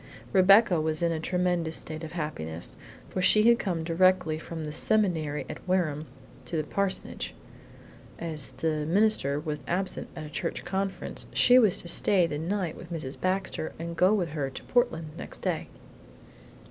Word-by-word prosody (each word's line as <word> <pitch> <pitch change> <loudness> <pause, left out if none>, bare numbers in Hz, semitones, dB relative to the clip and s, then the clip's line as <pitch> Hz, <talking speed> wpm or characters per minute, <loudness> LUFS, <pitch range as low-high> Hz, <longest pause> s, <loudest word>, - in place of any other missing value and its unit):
Rebecca 195 -2 +6
was 155 +1 -1
in 170 - +2
a 160 - -1
tremulous 175 -1 0
state 155 +1 -4
of 160 - -7
happiness, 80 - -5 0.4
for 185 - -1
she 210 +3 +5
had 235 0 +6
come 175 -5 -2
directly 170 -1 +2
from 165 0 -6
the 150 - -4
Seminary 160 -4 0
at - - -7
Wareham 160 -5 0 0.4
to 170 - -3
the 155 - 0
parsonage, 195 +5 -2 0.8
and 165 -1 -4
as 150 -3 0
the 155 -2 -2
minister 180 -7 +3
was 150 -1 -4
absent 185 +2 -2
at 155 - -6
a - - -8
church - - -3
conference, 195 +2 -3
she 250 0 +7
was 215 -7 +4
to - - -9
stay 180 +1 +3
the 150 -3 -3
night 180 0 -2
with 175 - -11
Mrs. 150 -5 -5
Baxter 185 -3 -1
and 170 +1 -5
go 185 +3 +4
with 190 -6 +1
her 145 -3 -2
to 130 - -9
Portland 165 -11 +1
next - - -9
day. - - -1
170 Hz, 170 wpm, -28 LUFS, 155-190 Hz, 0.8 s, she